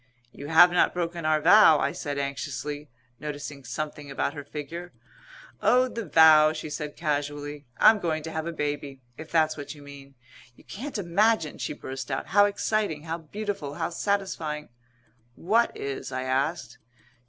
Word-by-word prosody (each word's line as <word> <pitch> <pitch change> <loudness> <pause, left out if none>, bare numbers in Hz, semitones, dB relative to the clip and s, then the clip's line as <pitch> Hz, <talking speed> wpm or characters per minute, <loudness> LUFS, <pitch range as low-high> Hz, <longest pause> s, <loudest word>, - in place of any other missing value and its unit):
"You 140 - -9
have 170 +3 +7
not 175 - +2
broken 170 -1 -3
our 155 0 +3
vow?" 185 -1 +7
I - - 0
said 145 -1 -5
anxiously, 140 +1 -4 0.3
noticing 145 -2 -6
something 145 +4 -5
about 140 +1 -2
her 145 - -7
figure. 160 +5 -7 0.7
"Oh, 255 +1 +4
the 230 -3 -5
vow," 155 0 +7
she 155 -1 -6
said 150 -1 -5
casually. 145 -2 -3
"I'm 220 -1 +6
going 160 -4 -2
to 160 - -6
have 160 +1 -3
a - - -2
baby, 145 -3 -4 0.2
if 160 0 -9
that's 155 -2 +2
what 145 0 -7
you 145 - -14
mean. 140 -1 -13 0.4
You - - -20
can't 265 +5 -6
imagine," 200 -2 +1
she - - -3
burst 135 -2 -7
out, 135 - -2
"how 205 +1 +6
exciting, 205 -6 -1
how 165 +1 -4
beautiful, 195 -3 -5
how - - -2
satisfying 170 -6 -2 0.4
" 120 0 -38 0.2
"What 235 +2 +3
is?" 140 -1 -5
I 130 0 -3
asked. 130 -1 -2
155 Hz, 165 wpm, -26 LUFS, 145-170 Hz, 0.7 s, have